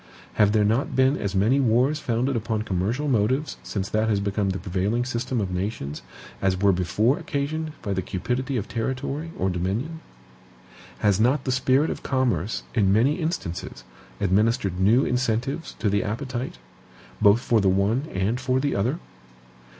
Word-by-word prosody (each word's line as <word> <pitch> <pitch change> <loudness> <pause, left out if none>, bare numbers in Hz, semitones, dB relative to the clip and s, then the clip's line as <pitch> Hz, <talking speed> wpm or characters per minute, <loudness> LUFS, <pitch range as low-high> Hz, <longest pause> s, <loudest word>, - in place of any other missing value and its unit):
Have 105 -2 +4
there 105 -1 +3
not 115 +6 0
been 130 +2 +4
as 100 -6 -3
many 110 +8 +3
wars 130 +4 +2
founded 125 +1 0
upon 110 -1 -1
commercial 110 +9 -1
motives 130 +4 +1
since 100 -2 -3
that 110 +1 +1
has 105 -2 +2
become 100 0 -1
the 95 - -1
prevailing 100 +6 -1
system 125 0 -2
of 95 -3 -2
nations, 90 -6 -3 0.4
as 95 -1 +1
were 100 0 +4
before 95 - +1
occasioned 155 +2 -3
by 100 -3 -1
the 95 - -1
cupidity 125 +9 -2
of 105 -2 -3
territory 130 +6 -3
or 95 0 0
dominion? 105 - -2 1.0
Has 100 -2 +3
not 130 +5 +3
the 130 - -1
spirit 130 +4 +2
of - - -5
commerce, 115 - 0
in 100 -5 +3
many 120 +9 +3
instances, 95 - -4 0.4
administered 100 -1 +1
new 110 +8 +4
incentives 125 +5 -1
to 110 - -1
the 100 -1 +2
appetite, 120 - -4 0.6
both 105 +2 +6
for 115 -3 +2
the 95 - +3
one 105 +9 +1
and 100 +6 0
for 130 0 +1
the 140 +1 0
other? 120 +10 0
115 Hz, 165 wpm, -24 LUFS, 100-130 Hz, 1.0 s, both